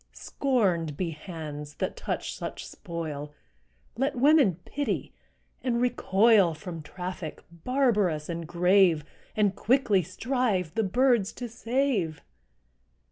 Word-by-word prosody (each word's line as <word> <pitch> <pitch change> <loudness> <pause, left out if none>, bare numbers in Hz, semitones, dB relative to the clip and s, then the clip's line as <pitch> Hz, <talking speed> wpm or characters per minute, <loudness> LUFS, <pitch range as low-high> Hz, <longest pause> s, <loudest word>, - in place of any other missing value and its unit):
Scorned 185 - 0
be 175 -3 -1
hands 150 -3 -7
that - - -3
touch - - -3
such - - -6
spoil! 150 -3 -6 0.6
Let 270 +3 0
women 270 - +5
pity, 285 0 -3 0.5
and 240 -2 +1
recoil 210 -6 +4
From 170 -1 -7
traffic, 180 0 -6
barbarous 200 - +1
and 170 -1 -4
grave, 175 -2 +4 0.3
And 205 -2 +2
quickly 235 -5 +3
strive 215 - -1
the 225 - +1
birds 240 0 +2
to 245 - -6
save. 230 - -1
190 Hz, 110 wpm, -27 LUFS, 165-245 Hz, 0.6 s, women